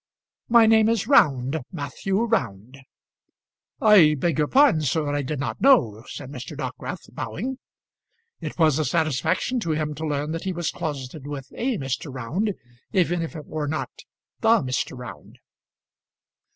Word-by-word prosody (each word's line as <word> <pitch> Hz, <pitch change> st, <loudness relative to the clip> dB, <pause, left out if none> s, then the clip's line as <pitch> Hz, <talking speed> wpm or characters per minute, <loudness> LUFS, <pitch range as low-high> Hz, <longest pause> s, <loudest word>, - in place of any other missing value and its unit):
"My 235 Hz, -1 st, +7 dB
name 220 Hz, 0 st, +5 dB
is 230 Hz, -4 st, +1 dB
Round 140 Hz, -, +3 dB
Matthew 190 Hz, +6 st, -2 dB
Round." 125 Hz, -, -2 dB, 1.0 s
"I 190 Hz, -9 st, +6 dB
beg 160 Hz, +1 st, 0 dB
your 150 Hz, -, +2 dB
pardon, 265 Hz, -, +5 dB
sir; 150 Hz, +1 st, 0 dB
I 145 Hz, -, 0 dB
did 145 Hz, +1 st, -4 dB
not 140 Hz, -, -4 dB
know," 120 Hz, -, +4 dB
said 135 Hz, -1 st, -8 dB
Mr. 130 Hz, -3 st, -8 dB
Dockwrath, -, -, -6 dB
bowing. 250 Hz, -, -4 dB, 0.8 s
It -, -, -6 dB
was 160 Hz, -4 st, +3 dB
a 155 Hz, -, +1 dB
satisfaction 160 Hz, -, 0 dB
to 165 Hz, -8 st, -1 dB
him 150 Hz, -1 st, -2 dB
to 155 Hz, +2 st, -4 dB
learn 150 Hz, +1 st, -2 dB
that 165 Hz, +2 st, -4 dB
he 190 Hz, -, -1 dB
was 170 Hz, -2 st, -2 dB
closeted 140 Hz, -1 st, -5 dB
with 140 Hz, -2 st, -7 dB
a 250 Hz, -2 st, -1 dB
Mr. 135 Hz, 0 st, -4 dB
Round, 165 Hz, -, -2 dB, 0.4 s
even 175 Hz, -2 st, +1 dB
if 165 Hz, -, -5 dB
it 155 Hz, -2 st, -7 dB
were 155 Hz, -2 st, -4 dB
not 155 Hz, -, -3 dB, 0.5 s
the 225 Hz, -, +4 dB
Mr. 130 Hz, 0 st, -2 dB
Round. 125 Hz, -5 st, -10 dB
155 Hz, 155 wpm, -24 LUFS, 135-195 Hz, 1.0 s, My